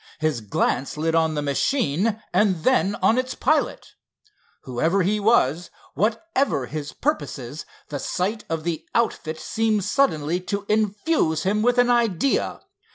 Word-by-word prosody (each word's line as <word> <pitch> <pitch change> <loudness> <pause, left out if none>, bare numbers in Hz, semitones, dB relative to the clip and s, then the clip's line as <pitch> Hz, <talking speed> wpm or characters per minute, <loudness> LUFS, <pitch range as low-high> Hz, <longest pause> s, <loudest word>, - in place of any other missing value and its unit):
His 155 -6 -1
glance 120 +7 -1
lit 160 +1 0
on 160 -1 +2
the 150 - -1
machine 200 - 0
and 190 -6 +2
then 205 -6 +2
on 235 - +4
its 255 0 -3
pilot. - - 0 0.7
Whoever 160 +10 0
he 210 +4 +1
was, 180 - +2 0.2
whatever 230 - 0
his 150 +2 -5
purposes, 150 - -3 0.2
the 145 - -4
sight 195 +9 -2
of 160 -1 -2
the 165 -1 -3
outfit 160 -9 0
seemed 220 0 0
suddenly 180 - +1
to 200 +2 -4
infuse 210 - +1
him 205 +3 +1
with 245 +2 +2
an 245 0 +4
idea. 235 0 +1
190 Hz, 140 wpm, -23 LUFS, 155-225 Hz, 0.7 s, on